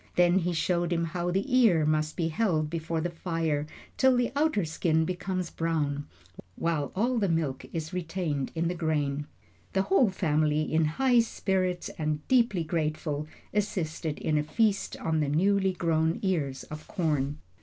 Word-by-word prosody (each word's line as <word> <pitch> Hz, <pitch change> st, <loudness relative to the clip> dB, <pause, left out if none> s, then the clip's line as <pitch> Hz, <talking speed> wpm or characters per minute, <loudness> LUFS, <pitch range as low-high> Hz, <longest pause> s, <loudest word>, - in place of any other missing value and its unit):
Then 175 Hz, +1 st, +5 dB
he 180 Hz, 0 st, -1 dB
showed 175 Hz, +1 st, 0 dB
him 170 Hz, -1 st, +1 dB
how 175 Hz, +1 st, -2 dB
the 190 Hz, +3 st, 0 dB
ear 195 Hz, -12 st, +5 dB
must 155 Hz, 0 st, 0 dB
be 165 Hz, -1 st, 0 dB
held 155 Hz, -5 st, 0 dB
before 165 Hz, -1 st, -2 dB
the 175 Hz, +1 st, -2 dB
fire 165 Hz, -3 st, -1 dB, 0.3 s
till 260 Hz, -1 st, +4 dB
the 245 Hz, -1 st, +1 dB
outer 290 Hz, -, +2 dB
skin 160 Hz, 0 st, +1 dB
becomes 185 Hz, 0 st, -3 dB
brown, 150 Hz, -3 st, -1 dB, 0.5 s
while 160 Hz, -4 st, -1 dB
all 235 Hz, +5 st, +1 dB
the 200 Hz, -3 st, +1 dB
milk 155 Hz, -5 st, -1 dB
is 160 Hz, +1 st, -4 dB
retained 165 Hz, -5 st, -2 dB
in 165 Hz, +1 st, 0 dB
the 175 Hz, -, 0 dB
grain. 150 Hz, -4 st, -1 dB, 0.5 s
The 190 Hz, -, +2 dB
whole 265 Hz, -, +4 dB
family, 155 Hz, -4 st, +1 dB
in 160 Hz, +1 st, +1 dB
high 245 Hz, +10 st, +3 dB
spirits 185 Hz, -5 st, 0 dB
and 150 Hz, -1 st, -2 dB
deeply 235 Hz, -9 st, +3 dB
grateful, 155 Hz, -2 st, -2 dB, 0.3 s
assisted 165 Hz, -7 st, -2 dB
in 155 Hz, -1 st, 0 dB
a -, -, 0 dB
feast 210 Hz, +5 st, 0 dB
on 160 Hz, -1 st, 0 dB
the 150 Hz, -2 st, +1 dB
newly 190 Hz, +5 st, +2 dB
grown 165 Hz, -2 st, +1 dB
ears 150 Hz, -9 st, -1 dB
of 155 Hz, 0 st, -9 dB
corn. 150 Hz, -5 st, -1 dB
165 Hz, 165 wpm, -28 LUFS, 155-185 Hz, 0.5 s, Then